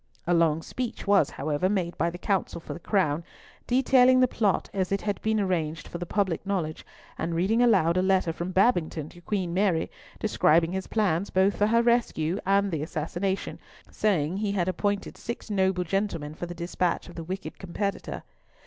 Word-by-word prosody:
A 175 - +2
long 165 -2 +3
speech 250 +5 -5
was, 200 -7 +4
however, 150 +5 -1
made 180 -4 -1
by 170 +3 +1
the 175 - -7
counsel 190 -1 -1
for - - -7
the - - -8
Crown, 170 -5 +1 0.4
detailing 255 0 +5
the 255 - +5
plot 210 -5 0
as 190 -2 -1
it 195 - 0
had 205 -2 -2
been 220 0 +1
arranged 165 -5 -1
for 170 - -6
the 175 - -5
public 190 -4 0
knowledge, 180 -6 -2 0.4
and 165 +1 -2
reading 200 +8 +2
aloud 185 -8 +4
a - - +4
letter 190 -3 +2
from 170 +2 -4
Babington 175 -6 +1
to 175 - -15
Queen 185 -2 -2
Mary, 185 -4 +1 0.3
describing 165 +2 +3
his 190 0 -3
plans 200 -4 0
both 190 +2 +2
for 205 - +2
her 230 +2 +3
rescue 210 -7 +1
and 200 0 +3
the 160 -3 -2
assassination, 175 +5 -3 0.3
saying, 180 -5 0
"he 205 -1 -1
had 185 -3 0
appointed 200 +2 -1
six 235 -2 -6
noble 190 -2 +1
gentlemen 175 -5 -2
for 175 +3 -6
the 175 - -7
despatch 175 +1 -1
of 175 - -11
the 165 - -6
wicked 190 +4 -6
competitor." 200 +2 -4
185 Hz, 185 wpm, -27 LUFS, 170-205 Hz, 0.4 s, detailing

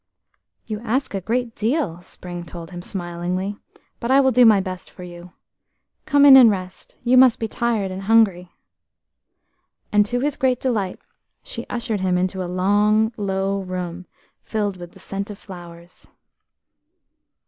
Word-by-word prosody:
"You 215 -2 -5
ask 240 +4 -2
a 195 - -2
great 235 +4 -2
deal," 215 - -1
Spring 175 -1 -9
told 170 0 -9
him, 175 -1 -7
smilingly, 180 +2 -4 0.4
"but 235 - -4
I 270 +1 +5
will 265 -1 +4
do 245 -1 +6
my 215 -3 +6
best 185 -1 -6
for 180 - -12
you. 175 0 -11 0.7
Come 285 -1 +5
in 275 -2 +10
and 250 -4 +9
rest–you 200 +6 -2
must 255 -3 +6
be 225 - -2
tired 220 -4 -1
and 185 +1 -6
hungry." 195 -4 +2 1.4
And 210 0 +5
to 245 +3 -1
his 290 +1 -1
great 255 -2 +1
delight 210 -8 -1 0.5
she - - -7
ushered 230 -3 -3
him 185 -1 +1
into 185 +1 -1
a 175 - -5
long, 210 +4 +2
low 195 -1 -1
room, 180 -1 -6 0.3
filled 205 -3 -2
with 175 -1 -10
the - - -16
scent 195 +1 -5
of 205 - -8
flowers. 175 -3 -12
200 Hz, 155 wpm, -21 LUFS, 180-230 Hz, 1.4 s, in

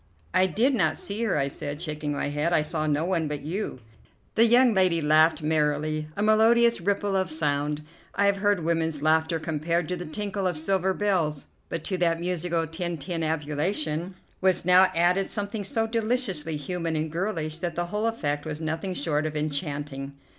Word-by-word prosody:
"I 185 - +4
did 230 - +2
not 245 - +1
see 205 +3 -4
her," 210 - +1
I 140 -1 +1
said, 145 +1 -5
shaking 150 -3 -3
my 145 - -2
head; 150 +4 0
"I 155 - +3
saw 155 0 -2
no 150 +2 +1
one 170 -4 0
but 145 -1 -4
you." 165 -4 -4 0.5
The 230 - +5
young 240 +1 +5
lady 185 -4 +3
laughed 155 +1 +4
merrily, 155 0 0
a 205 - 0
melodious 230 +1 +4
ripple 200 +2 0
of 190 -2 +1
sound. 150 -1 -1 0.3
I 200 - +2
have 200 0 +3
heard 205 -3 +1
women's 160 -2 0
laughter 160 +1 +2
compared 160 +1 -1
to 180 - -1
the 175 -1 -6
tinkle 200 +3 -2
of 175 -3 -2
silver 190 +3 +1
bells, 170 -9 0 0.2
but 165 -1 -4
to 185 +1 -2
that 165 -1 +2
musical 170 -1 -1
tintinnabulation 160 +1 -2 0.3
was 185 -2 +2
now 185 +1 +7
added 180 +3 +2
something 205 0 -3
so 225 +3 0
deliciously 220 - -1
human 165 +2 -3
and 155 0 -2
girlish 165 -3 -2
that 175 -2 -3
the 175 - -1
whole 210 +5 -1
effect 150 -10 -2
was 155 -1 -5
nothing 160 +4 -3
short 155 -2 0
of 155 -1 -4
enchanting. 145 -2 -3
165 Hz, 180 wpm, -26 LUFS, 155-190 Hz, 0.5 s, now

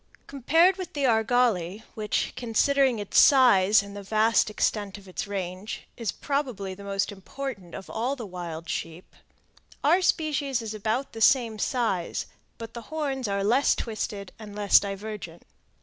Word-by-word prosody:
Compared 325 +8 +3
with 370 -2 -6
the 285 - -2
argali, 220 -5 +2
which, 210 -1 -2
considering 255 +2 +2
its 205 -2 +2
size 215 -7 +6
and 200 0 -10
the 205 - -6
vast 215 +3 +2
extent 210 -1 -1
of 200 -1 -15
its 185 +3 -5
range, 190 0 -5
is 230 -6 -2
probably 255 -10 -3
the 200 +2 -11
most 195 0 -1
important 200 -2 -7
of 195 - -8
all 250 +5 -2
the 240 -5 -7
wild 175 -3 -7
sheep, 165 +3 -6 0.7
our 335 +6 +4
species 290 -7 +1
is 220 -2 -5
about 220 +5 -2
the 225 - -7
same 230 -3 +4
size, 220 -8 -1 0.3
but 230 0 -8
the 235 - -7
horns 280 -5 -2
are 200 0 -1
less 245 +7 +3
twisted 205 -3 -4
and 210 -2 -10
less 205 -1 +5
divergent. 200 -4 -6
220 Hz, 155 wpm, -26 LUFS, 200-260 Hz, 0.7 s, size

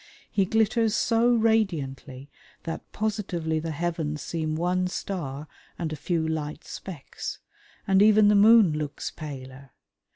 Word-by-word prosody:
He 195 -3 +2
glitters 220 +1 +2
so 230 +2 +3
radiantly 150 - -1 0.3
that 165 - -6
positively 185 -7 -2
the 165 +1 -4
heavens 160 -1 -3
seem 155 -2 -2
one 180 +2 0
star 155 -6 -5 0.3
and 160 -2 -3
a - - -3
few 160 +2 -1
light 155 -1 -3
specks, 170 -8 -7 0.5
and 195 0 +4
even 215 0 +6
the 210 - +5
moon 210 -3 +6
looks 150 -1 -4
paler. 135 -3 -9
170 Hz, 130 wpm, -26 LUFS, 150-205 Hz, 0.5 s, even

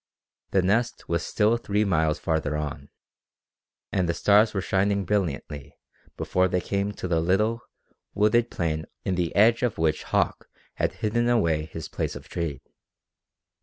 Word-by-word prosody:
The 95 -2 +2
Nest 115 +6 0
was 85 0 0
still 110 +2 +2
three 105 -2 0
miles 80 -5 +1
farther 80 -2 -1
on, 75 -2 -5 1.0
and 90 -3 0
the 85 - 0
stars 105 +2 +4
were 100 - -2
shining 100 +1 +1
brilliantly 80 -7 -3 0.4
before 90 0 +1
they 90 0 0
came 100 +2 -2
to 95 - -5
the 85 -2 +1
little, 105 +7 +1 0.5
wooded 110 +3 +3
plain 80 -2 -2 0.2
in 95 - 0
the 90 -3 -1
edge 115 +4 +5
of 125 -4 0
which 80 -1 0
Hauck - - 0 0.2
had - - -1
hidden 120 +3 +1
away 85 -10 +2
his 80 0 -7
place - - -3
of - - -10
trade. 80 -6 -4
95 Hz, 155 wpm, -26 LUFS, 80-105 Hz, 1.0 s, edge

